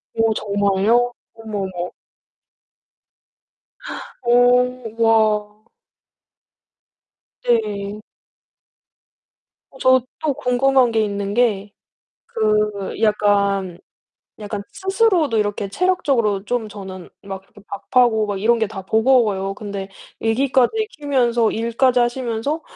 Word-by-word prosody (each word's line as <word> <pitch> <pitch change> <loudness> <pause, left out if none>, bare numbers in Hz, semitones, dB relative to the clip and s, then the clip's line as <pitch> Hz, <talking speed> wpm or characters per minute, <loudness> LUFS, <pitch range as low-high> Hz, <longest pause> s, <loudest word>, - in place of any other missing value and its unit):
오, 225 -1 +2
정말요? 205 +4 +1 0.2
어머, 220 -2 -6 0.2
어머. 175 0 -4 2.3
오, 245 -1 +2
와. 215 -2 +2 1.9
네. 210 -3 -1 1.7
어, - - -17
저 260 0 +4 0.2
또 305 -2 0
궁금한 255 0 +2
게 220 -1 +2
있는 200 -1 -3
게 210 -4 0 0.6
그 215 -1 0
약간, 200 -3 +1 0.6
약간 205 -1 -5
스스로도 380 - +1
이렇게 205 -1 -1
체력적으로 265 - +1
좀 230 +1 -2
저는 190 -3 -9
막 195 -1 -7
그 205 - -14 0.3
밥하고 240 -4 +4
막 205 -2 -3
이런 235 +1 +3
게 220 - +1
다 200 -2 -7
버거워요. 220 -5 +2
근데 200 -2 -6 0.3
애기까지 265 - +1
키우면서 245 -6 +1
일까지 235 +3 +1
하시면서 240 +4 -2
225 Hz, 190 characters per minute, -20 LUFS, 205-245 Hz, 2.3 s, 저